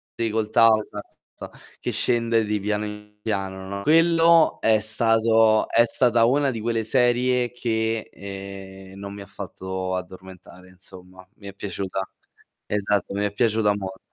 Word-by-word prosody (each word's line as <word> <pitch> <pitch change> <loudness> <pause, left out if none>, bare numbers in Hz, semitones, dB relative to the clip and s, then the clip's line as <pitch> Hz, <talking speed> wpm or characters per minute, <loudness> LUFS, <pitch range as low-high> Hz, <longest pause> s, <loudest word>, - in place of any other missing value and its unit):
sì, 115 -1 -1
col 110 0 -1
tavo 110 -1 +5
esatto, 105 -1 -11 0.2
esa - - -9 0.3
che - - -3
scende 115 -1 +1
di 105 0 -1
piano 105 +1 -2
in 105 0 -10
piano, 95 -3 -4
no 100 +1 -5
Quello 165 +2 +4
è 110 -1 +3
stato 110 0 +3
è 115 - +5
stata 120 -1 +2
una 140 +3 +2
di 115 - -5
quelle 115 0 -1
serie 125 +1 +1
che, 110 -2 -2
ehm, 95 -1 -10
non 100 0 -7
mi 100 - -9
ha - - -9
fatto 95 -2 -5
addormentare, 90 0 -10
insomma, 95 0 -15
mi 100 - -13
è 100 - -8
piaciuta. 95 -1 -4 0.6
Esatto, 105 -2 -1
mi 100 +1 0
è 100 - -3
piaciuta 110 -1 +1
mol 95 -1 -6
105 Hz, 155 wpm, -23 LUFS, 95-115 Hz, 0.6 s, tavo